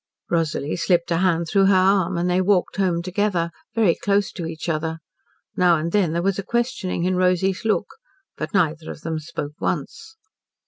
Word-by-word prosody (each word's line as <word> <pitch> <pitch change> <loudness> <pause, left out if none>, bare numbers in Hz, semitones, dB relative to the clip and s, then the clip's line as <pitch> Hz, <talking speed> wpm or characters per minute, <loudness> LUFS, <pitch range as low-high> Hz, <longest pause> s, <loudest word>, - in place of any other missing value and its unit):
Rosalie 160 -3 0
slipped 175 -1 +1
a 165 - +2
hand 170 -2 +2
through 195 +3 +3
her 195 - +5
arm, 185 -1 +3
and 175 +1 0
they 180 +1 +2
walked 190 0 +1
home 175 -3 +1
together, 185 -2 0 0.2
very 215 -7 +4
close 200 +2 0
to 170 -3 -5
each 160 0 -6
other. 160 0 -1 0.6
Now 175 -2 +4
and 165 +2 -3
then 190 -5 +2
there 170 +1 -1
was 195 0 0
a - - -3
questioning 235 -6 -1
in 185 +1 +1
Rosy's 185 +1 +1
look. 220 - +1 0.5
But - - -5
neither 165 -5 0
of - - -8
them 160 -1 -3
spoke 150 -1 -6
once. 440 - -4
180 Hz, 185 wpm, -22 LUFS, 165-195 Hz, 0.6 s, her